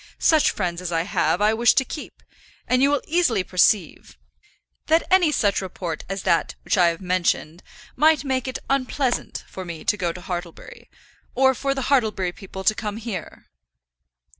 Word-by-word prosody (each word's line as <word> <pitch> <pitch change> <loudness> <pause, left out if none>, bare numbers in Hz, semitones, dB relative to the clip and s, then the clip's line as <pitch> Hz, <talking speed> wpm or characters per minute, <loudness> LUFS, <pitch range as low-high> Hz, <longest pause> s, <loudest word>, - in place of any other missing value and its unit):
Such 315 -2 +4
friends 175 -3 -3
as 180 -1 -4
I 165 -1 0
have, 180 +1 0
I 215 +1 +4
wish 235 +1 +4
to 265 - +2
keep, 300 - -9 0.4
and 255 0 +2
you 275 - +5
will 290 -1 0
easily 300 - +1
perceive 180 - +1 0.7
that 320 +2 +3
any 365 -4 +5
such 205 -9 +1
report 175 -4 -5
as 195 -1 -4
that 165 - +1
which - - 0
I 180 -3 +5
have 170 +1 -2
mentioned, 180 -2 -1 0.3
might 310 -1 +4
make 265 -2 -1
it 260 - -3
unpleasant 265 -1 -1
for 190 - -8
me 170 0 -8
to 220 -2 +1
go 175 -3 -1
to 180 - -10
Hartlebury, 180 - -7 0.5
or 265 +1 +4
for 275 +2 -2
the 270 - -2
Hartlebury 220 -10 +1
people 190 -1 -9
to 215 - +4
come 215 -1 -5
here." 220 -7 -7
210 Hz, 175 wpm, -23 LUFS, 180-265 Hz, 0.7 s, you